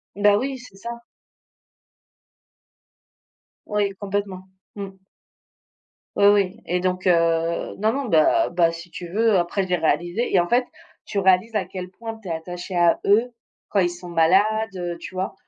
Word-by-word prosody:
Beh, 205 Hz, 0 st, +4 dB
oui, 265 Hz, +5 st, -2 dB
c'est 240 Hz, -5 st, -14 dB
ça. 235 Hz, +4 st, -7 dB, 2.8 s
Oui, 205 Hz, -1 st, 0 dB
complètement. 200 Hz, -2 st, -4 dB, 0.3 s
Mmh. 200 Hz, -1 st, -5 dB, 1.3 s
Oui, 200 Hz, -, +3 dB
oui, 205 Hz, 0 st, +3 dB
et 180 Hz, +1 st, 0 dB
donc 185 Hz, +1 st, -1 dB
heu 165 Hz, -1 st, +1 dB
non, 215 Hz, +2 st, +2 dB
non, 275 Hz, +3 st, -2 dB
beh 160 Hz, -9 st, +4 dB, 0.3 s
beh, 170 Hz, -1 st, +3 dB
si 165 Hz, +1 st, -10 dB
tu 175 Hz, -, -7 dB
veux 220 Hz, +1 st, +3 dB
après, 175 Hz, +3 st, -1 dB
j'ai 180 Hz, -, +1 dB
réalisé 175 Hz, +8 st, 0 dB
et 190 Hz, -, +5 dB
en 175 Hz, -, +1 dB
fait, 245 Hz, +5 st, +2 dB, 0.4 s
tu 200 Hz, -, -5 dB
réalises 190 Hz, +4 st, +3 dB
à -, -, +1 dB
quel 185 Hz, -1 st, -7 dB
point 225 Hz, +3 st, -8 dB
tu 210 Hz, -, -12 dB
es 170 Hz, -, -3 dB
attaché 175 Hz, +3 st, -6 dB
à 175 Hz, -1 st, +4 dB
eux, 225 Hz, +5 st, +3 dB, 0.4 s
quand 200 Hz, -, +1 dB
ils 175 Hz, -2 st, +3 dB
sont 175 Hz, 0 st, -9 dB
malades, 170 Hz, +4 st, +4 dB, 0.3 s
heu, 175 Hz, -1 st, -4 dB
tu -, -, -9 dB
vois? 185 Hz, +1 st, -2 dB
185 Hz, 165 wpm, -23 LUFS, 175-205 Hz, 2.8 s, et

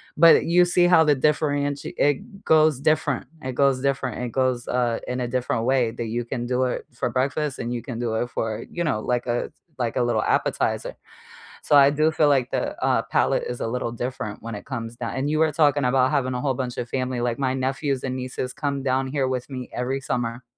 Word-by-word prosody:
but 165 Hz, +2 st, +6 dB
you 180 Hz, +2 st, +5 dB
see 175 Hz, 0 st, +3 dB
how 175 Hz, -2 st, +6 dB
the 150 Hz, -1 st, +4 dB
differenti 145 Hz, 0 st, 0 dB
it 195 Hz, -, -1 dB
goes 155 Hz, -3 st, +4 dB
different, 150 Hz, -2 st, +1 dB, 0.2 s
it 130 Hz, -1 st, -4 dB
goes 135 Hz, -1 st, +2 dB
different, 135 Hz, -3 st, -1 dB
it 125 Hz, -, -3 dB
goes, 130 Hz, -2 st, 0 dB
uh, 120 Hz, -2 st, 0 dB
in 125 Hz, 0 st, -2 dB
a 120 Hz, -, -1 dB
different 120 Hz, -2 st, -1 dB
way 130 Hz, -2 st, +2 dB
that 120 Hz, 0 st, -5 dB
you 115 Hz, +2 st, -2 dB
can 120 Hz, 0 st, -4 dB
do 125 Hz, +1 st, 0 dB
it 125 Hz, -, -3 dB
for 120 Hz, -, -2 dB
breakfast 135 Hz, +3 st, -1 dB
and 120 Hz, +1 st, -3 dB
you 120 Hz, -, -3 dB
can 120 Hz, -4 st, -6 dB
do 120 Hz, -2 st, -2 dB
it 120 Hz, +2 st, -1 dB
for, 110 Hz, -3 st, -3 dB
you 175 Hz, -, -2 dB
know, 150 Hz, -10 st, 0 dB
like 125 Hz, +2 st, -1 dB
a 120 Hz, 0 st, -1 dB
s -, -, -12 dB, 0.3 s
like 120 Hz, -2 st, -1 dB
a 125 Hz, -, +2 dB
little 120 Hz, -, +1 dB
appetizer. -, -, 0 dB, 0.7 s
So, 145 Hz, -, +4 dB
I 140 Hz, 0 st, +7 dB
do 155 Hz, +2 st, +2 dB
feel 155 Hz, -1 st, +3 dB
like 135 Hz, -4 st, +2 dB
the, -, -, -2 dB
uh, -, -, +2 dB
palate -, -, +1 dB
is 125 Hz, -, -5 dB
a -, -, -1 dB
little 120 Hz, 0 st, -3 dB
different 120 Hz, -4 st, -5 dB
when 115 Hz, 0 st, -5 dB
it 105 Hz, -, -7 dB
comes 115 Hz, -3 st, -6 dB
down 120 Hz, -2 st, -4 dB
and 135 Hz, +2 st, -1 dB
you 155 Hz, 0 st, 0 dB
were 160 Hz, -1 st, +3 dB
talking 145 Hz, -3 st, +3 dB
about 130 Hz, +1 st, +3 dB
having 130 Hz, -3 st, 0 dB
a 125 Hz, -, -3 dB
whole 135 Hz, -1 st, +1 dB
bunch 125 Hz, -1 st, -3 dB
of 120 Hz, -, -4 dB
family, 130 Hz, -1 st, -2 dB
like, 120 Hz, +1 st, -1 dB
my 130 Hz, -2 st, +1 dB
nephews 135 Hz, +1 st, -1 dB
and 130 Hz, -1 st, -2 dB
nieces 125 Hz, 0 st, -4 dB
come 140 Hz, -1 st, -3 dB
down 130 Hz, 0 st, 0 dB
here 135 Hz, -1 st, -1 dB
with 130 Hz, 0 st, -3 dB
me 130 Hz, -2 st, -6 dB
every 130 Hz, +2 st, -2 dB
summer. 120 Hz, -2 st, -3 dB
130 Hz, 235 wpm, -24 LUFS, 120-145 Hz, 0.7 s, I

